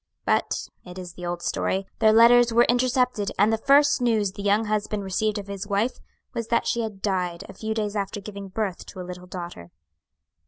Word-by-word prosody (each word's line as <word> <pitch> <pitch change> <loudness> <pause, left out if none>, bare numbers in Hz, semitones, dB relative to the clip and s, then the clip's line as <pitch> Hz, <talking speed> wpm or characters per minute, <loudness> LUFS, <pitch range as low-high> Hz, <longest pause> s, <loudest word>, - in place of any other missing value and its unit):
"But - - 0 0.2
it 180 0 -11
is 180 -2 -7
the 175 -1 -7
old 175 0 -4
story 190 +1 -1
their 220 -1 +5
letters 235 +2 +6
were 235 +1 +5
intercepted, 250 -3 +1
and 210 +3 +4
the - - +2
first 285 +2 +4
news 220 -5 +2
the 200 - -8
young 205 +2 +2
husband 210 -1 -1
received 210 +3 -1
of 205 - -5
his 200 0 -6
wife 205 +5 0 0.3
was 230 -2 -3
that 235 0 +1
she 235 - 0
had 215 -4 -6
died 180 -4 -1
a - - -10
few 220 +3 -4
days 210 -1 -2
after 205 +1 -2
giving 200 -1 -8
birth 195 -1 -3
to - - -10
a 180 - -5
little 180 0 -9
daughter." 175 - -8
205 Hz, 205 wpm, -25 LUFS, 190-230 Hz, 0.3 s, letters